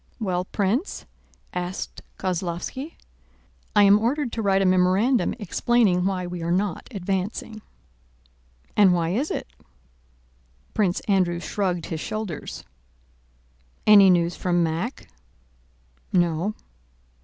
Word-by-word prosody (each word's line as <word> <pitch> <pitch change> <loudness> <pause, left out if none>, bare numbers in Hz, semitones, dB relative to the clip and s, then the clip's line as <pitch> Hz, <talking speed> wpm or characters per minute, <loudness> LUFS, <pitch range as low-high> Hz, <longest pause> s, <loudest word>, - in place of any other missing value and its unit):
"Well, 185 -4 -1
Prince?" 215 - -1 0.5
asked 180 +1 -4 0.2
Kozlóvski. 185 - -3 0.8
"I 205 - +7
am 200 +1 +6
ordered 250 +3 0
to 225 - -3
write 195 -2 +2
a - - +1
memorandum 185 +7 +3
explaining 205 -2 +2
why 185 -2 -1
we 175 -1 -5
are 165 - -2
not 185 -1 -1
advancing." 200 +1 -3 1.1
"And 195 -4 +6
why 165 -1 0
is 250 - -1
it?" - - -3 1.3
Prince 190 -4 +1
Andrew 185 -4 +1
shrugged 180 -2 -2
his 160 - -4
shoulders. 215 -4 -5 1.2
"Any 200 -2 +8
news 175 -1 +3
from 175 -1 +1
Mack?" 165 - -3 1.0
"No." 175 +3 +1
190 Hz, 110 wpm, -24 LUFS, 175-210 Hz, 1.3 s, Any